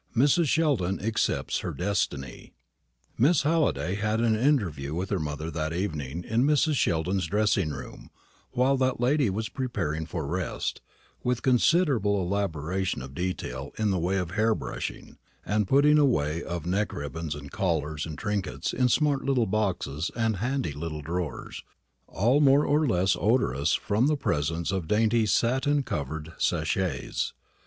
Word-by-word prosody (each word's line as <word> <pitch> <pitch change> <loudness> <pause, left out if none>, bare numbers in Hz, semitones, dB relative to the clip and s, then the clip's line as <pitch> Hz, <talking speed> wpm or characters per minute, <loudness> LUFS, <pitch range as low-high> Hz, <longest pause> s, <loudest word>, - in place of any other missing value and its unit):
MRS. 145 +7 +4
SHELDON 135 - +1
ACCEPTS 110 +2 0
HER - - -4
DESTINY. 80 -9 -3 0.7
Miss 145 +6 +4
Halliday 145 - +1
had 110 +2 0
an 115 -1 +3
interview 95 - 0
with 95 +3 -3
her 100 - +1
mother 75 +1 -4
that 80 0 -2
evening 80 -3 -3
in 115 +5 +1
Mrs. 150 +2 +3
Sheldon's 90 - 0
dressing 100 -3 +1
room, 70 -3 -8 0.4
while 130 +2 +2
that 130 -2 +1
lady 130 0 +2
was 110 +4 -2
preparing 80 - -3
for 80 -2 -4
rest, 90 +4 -3 0.4
with 125 -1 -1
considerable 125 - +3
elaboration 90 -4 -2
of 65 0 -9
detail 70 -6 -4
in 110 -2 +1
the 95 - 0
way 90 +4 0
of 90 -3 -2
hair 110 +3 +2
brushing, 65 -6 -6 0.3
and 105 -1 +1
putting 150 +4 +5
away 85 - +2
of 85 -2 -5
neck 100 +4 0
ribbons 75 +2 -4
and 70 -1 -9
collars 80 -6 -1
and 75 -3 -7
trinkets 100 -1 -2
in 125 0 +2
smart 145 +1 +2
little 130 -4 +2
boxes 95 -7 -1
and 110 -3 0
handy 125 - -1
little 75 +1 -5
drawers, 85 0 -4 0.5
all 120 - +2
more 140 +1 +5
or 150 +1 +2
less 95 -3 +2
odorous 80 - +2
from 110 +5 +1
the 150 0 +2
presence 80 - -1
of 95 -5 -2
dainty 110 +3 +2
satin 130 +7 +2
covered 80 - -4
sachets. 80 -3 -1
95 Hz, 150 wpm, -27 LUFS, 80-125 Hz, 0.7 s, putting